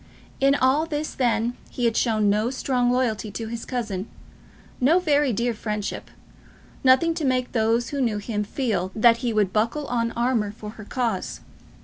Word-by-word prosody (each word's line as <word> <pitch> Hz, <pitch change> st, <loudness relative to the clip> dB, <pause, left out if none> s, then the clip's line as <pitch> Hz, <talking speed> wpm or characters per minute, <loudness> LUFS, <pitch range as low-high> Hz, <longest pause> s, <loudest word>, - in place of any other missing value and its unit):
In 275 Hz, +1 st, +4 dB
all 285 Hz, +4 st, +2 dB
this 305 Hz, -1 st, -3 dB
then 240 Hz, -1 st, 0 dB
he 245 Hz, -, -2 dB
had 230 Hz, -1 st, +2 dB
shown 215 Hz, -3 st, +2 dB
no 210 Hz, +3 st, +2 dB
strong 255 Hz, -1 st, 0 dB
loyalty 230 Hz, -4 st, 0 dB
to 225 Hz, +2 st, -5 dB
his 230 Hz, 0 st, -5 dB
cousin, 220 Hz, -6 st, -3 dB, 0.7 s
no 290 Hz, +7 st, +4 dB
very 295 Hz, -6 st, +2 dB
dear 235 Hz, +2 st, 0 dB
friendship, 210 Hz, -2 st, -4 dB, 0.7 s
nothing 265 Hz, +6 st, +5 dB
to 325 Hz, -1 st, -4 dB
make 255 Hz, -2 st, 0 dB
those 230 Hz, +1 st, +1 dB
who 280 Hz, -1 st, -2 dB
knew 225 Hz, -4 st, +1 dB
him 210 Hz, 0 st, -2 dB
feel 205 Hz, -5 st, -2 dB
that 230 Hz, +1 st, +5 dB
he 240 Hz, -1 st, -2 dB
would 210 Hz, -4 st, +1 dB
buckle 230 Hz, +8 st, 0 dB
on 230 Hz, -2 st, -1 dB
armour 235 Hz, -4 st, 0 dB
in 210 Hz, -, -6 dB
her 215 Hz, -1 st, -11 dB
cause. 245 Hz, +1 st, -2 dB
235 Hz, 170 wpm, -24 LUFS, 215-260 Hz, 0.7 s, nothing